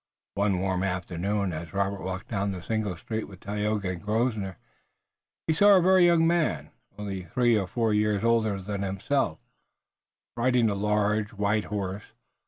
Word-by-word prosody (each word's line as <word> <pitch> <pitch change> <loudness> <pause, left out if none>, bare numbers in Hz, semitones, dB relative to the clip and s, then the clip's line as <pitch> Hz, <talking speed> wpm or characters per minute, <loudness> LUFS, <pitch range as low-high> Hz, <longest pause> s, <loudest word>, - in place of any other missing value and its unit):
One 100 -1 +1
warm 95 0 -1
afternoon 95 +1 -1
as 80 +2 -7
Robert 100 0 -1
walked 90 0 -5
down 100 -2 -1
the 90 -2 -7
single 105 -4 -2
street 110 +5 -4
with 95 -2 -13
Tayoga 105 -1 -2
and 90 - -6
Grosvenor, 105 -3 -1 0.9
he 160 - +2
saw 205 +5 +6
a - - +6
very 185 -1 +6
young 170 -1 +4
man, 155 - +1 0.3
only 100 -3 -5
three 120 +6 +2
or 100 -3 0
four 115 +2 0
years 105 -1 +1
older 110 -4 +2
than 100 0 -4
himself, 100 - -1 1.0
riding 120 -2 +2
a - - 0
large, 105 +2 0
white 105 +1 0
horse. 100 -1 -5
105 Hz, 160 wpm, -27 LUFS, 95-110 Hz, 1.0 s, saw